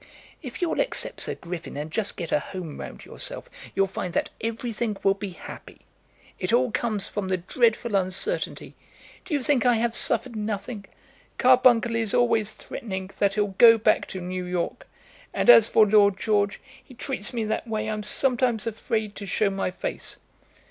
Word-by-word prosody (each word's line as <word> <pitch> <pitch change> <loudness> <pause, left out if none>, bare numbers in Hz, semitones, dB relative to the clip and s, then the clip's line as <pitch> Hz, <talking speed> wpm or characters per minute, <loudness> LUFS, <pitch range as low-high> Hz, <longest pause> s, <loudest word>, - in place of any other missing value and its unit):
"If 265 +3 -6
you'll 340 - 0
accept - - -2
Sir - - -1
Griffin, 170 -4 -7
and 150 +2 -5
just 205 +3 -1
get 170 -3 -5
a - - +3
home 170 -1 -7
round - - -8
yourself, - - -5 0.3
you'll 195 - +3
find 185 -2 -5
that - - 0
everything 230 -1 -3
will 195 - +4
be 200 0 -6
happy. 180 - -11 0.6
It 185 +1 -2
all 245 +1 +3
comes 215 -4 -1
from 205 -2 -4
the 185 0 +1
dreadful 230 +5 +1
uncertainty. 195 - -2 0.5
Do 350 -5 -2
you 280 - -1
think 285 -5 +2
I 245 -2 +4
have 230 +1 0
suffered 255 -3 0
nothing? 210 0 -4 0.5
Carbuncle 250 -2 +5
is 225 -3 +1
always 220 -3 +2
threatening 190 -6 -6
that 200 -1 +2
he'll 205 -2 0
go 230 -1 +9
back 215 - +2
to 190 - -6
New 180 +1 -4
York, 180 -1 -3 0.5
and 240 - +7
as 230 -2 +8
for 215 - +5
Lord 200 -2 +4
George, 205 -1 0 0.2
he 255 - -16
treats 245 -4 -3
me 235 -3 -2
that 220 +2 -2
way 215 -1 -2
I'm 215 -1 -2
sometimes 245 -1 +1
afraid 220 -1 -2
to 200 - -7
show 200 +2 +1
my 195 -1 -1
face." 180 - -6
215 Hz, 175 wpm, -25 LUFS, 195-235 Hz, 0.6 s, go